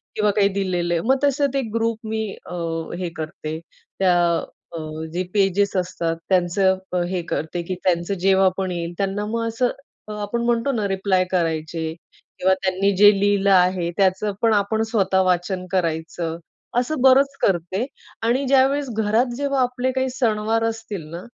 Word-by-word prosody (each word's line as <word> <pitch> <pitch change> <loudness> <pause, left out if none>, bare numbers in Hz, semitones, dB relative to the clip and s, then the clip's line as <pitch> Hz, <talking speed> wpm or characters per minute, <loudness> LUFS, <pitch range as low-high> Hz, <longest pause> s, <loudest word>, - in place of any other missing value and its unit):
किंवा 210 -1 +2
काही 200 0 +3
दिलेलं 185 -3 -1
आहे, 170 - +1
मग 265 +2 +4
तसंच 280 -1 +2
एक 265 -5 -1
ग्रुप 230 -1 0
मी 220 0 -2 0.2
अ, - - -8 0.4
हे 180 -1 -3
करते. 155 0 -5 0.4
त्या 185 -2 +4 0.6
अ, - - -4 0.3
जे 180 - -1
पेजेस 200 0 +2
असतात 175 -2 -1
त्यांचं 190 +1 +2 0.2
अ, 180 - +1
हे 180 -1 -1
करते 160 +3 -2
की 185 +2 -4
त्यांचं 175 +1 +1
जेव्हा 190 +1 +4
पण 190 -1 -2
येईल 170 -1 -4
त्यांना 200 +1 -1
मग 230 +2 -2
असं 230 +2 +1 0.4
अ, - - -7
आपण 205 +3 -2
म्हणतो 240 +3 +1
ना 215 -6 -1
रिप्लाय 190 -1 +1
करायचे 160 -2 -1 0.5
किंवा 190 +1 +4
त्यांनी 190 +1 +2
जे 205 +1 +8
लिहिलं 200 0 +2
आहे 180 -2 +3
त्याचंपण 200 +3 +2
आपण 210 +2 +1
स्वतः 190 -3 +2
वाचन 180 0 0
करायचं, 165 -2 -2 0.4
असं 250 +3 0
बरंच 270 +1 +5
करते 185 +4 0 0.4
आणि 245 +5 +1
ज्यावेळेस 275 +1 +3
घरात 220 +3 +2
जेव्हा 280 0 0
आपले 250 +1 0
काही 260 0 -1
सणवार 225 -3 0
असतील 225 -5 -3
ना, 170 +1 -6
195 Hz, 160 wpm, -22 LUFS, 180-230 Hz, 0.6 s, जे